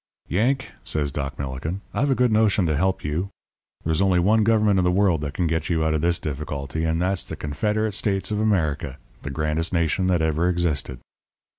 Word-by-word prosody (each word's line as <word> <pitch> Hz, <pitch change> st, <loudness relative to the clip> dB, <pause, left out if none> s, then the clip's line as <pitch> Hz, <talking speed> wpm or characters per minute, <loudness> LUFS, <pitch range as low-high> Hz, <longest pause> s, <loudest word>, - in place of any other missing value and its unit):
"'Yank,' 130 Hz, +9 st, 0 dB
says 75 Hz, -2 st, 0 dB
Doc 70 Hz, -1 st, -4 dB
Millikin, 70 Hz, +8 st, -4 dB
'I've 140 Hz, +3 st, +1 dB
a 135 Hz, -, +3 dB
good 125 Hz, -2 st, +2 dB
notion 105 Hz, -3 st, +3 dB
to 80 Hz, -2 st, +1 dB
help 95 Hz, +5 st, 0 dB
you. 80 Hz, +6 st, -2 dB, 0.6 s
There's 80 Hz, +2 st, +1 dB
only 95 Hz, -2 st, +3 dB
one 105 Hz, +5 st, +3 dB
government 105 Hz, -3 st, +3 dB
in -, -, +2 dB
the 90 Hz, -, +3 dB
world 90 Hz, -4 st, +2 dB
that 70 Hz, -1 st, -4 dB
can 90 Hz, -, 0 dB
get 80 Hz, -1 st, -1 dB
you 80 Hz, -2 st, +1 dB
out 80 Hz, -, +1 dB
of 80 Hz, -, 0 dB
this 85 Hz, +1 st, +2 dB
difficulty; 75 Hz, 0 st, -4 dB
and 80 Hz, 0 st, 0 dB
that's 90 Hz, +1 st, +1 dB
the -, -, -7 dB
Confederate 105 Hz, +8 st, -1 dB
States 95 Hz, -1 st, 0 dB
of 105 Hz, -, 0 dB
America, 80 Hz, -10 st, 0 dB, 0.2 s
the -, -, -5 dB
grandest 75 Hz, +4 st, -1 dB
nation 85 Hz, +2 st, +1 dB
that 90 Hz, -3 st, +2 dB
ever 80 Hz, +2 st, +1 dB
existed.' 80 Hz, -8 st, -1 dB
85 Hz, 200 wpm, -23 LUFS, 75-100 Hz, 0.6 s, a